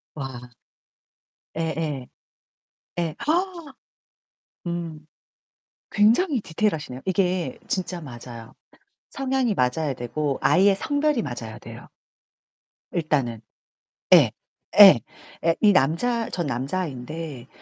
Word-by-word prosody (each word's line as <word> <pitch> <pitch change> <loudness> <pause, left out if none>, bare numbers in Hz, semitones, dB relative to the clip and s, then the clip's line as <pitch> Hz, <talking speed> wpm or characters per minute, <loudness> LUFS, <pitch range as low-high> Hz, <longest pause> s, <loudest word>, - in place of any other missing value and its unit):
와. 125 -3 -7 1.0
예예. 160 -5 -3 0.9
예. 165 -3 -2
와아. 340 -3 -1 0.9
음. 165 -3 -5 0.8
굉장히 235 - +3
디테일하시네요. 160 -8 -2
이게 185 +4 0
진짜 185 -2 -3
맞아요. 120 -4 -10 0.6
성향이 265 -4 0
맞아야 140 +1 0
되고 135 +3 -2
아이의 195 +2 +4
성별이 290 +3 0
맞아야 115 - -6
돼요. - - -11 1.0
일단은. 140 -9 -1 0.7
예. - - +7 0.5
예. - - +10 0.4
예, 165 0 +3
이 210 - +6
남자 220 - +1
전 175 -4 -3
남자아인데 140 0 -4
165 Hz, 200 characters per minute, -24 LUFS, 135-210 Hz, 1.0 s, 예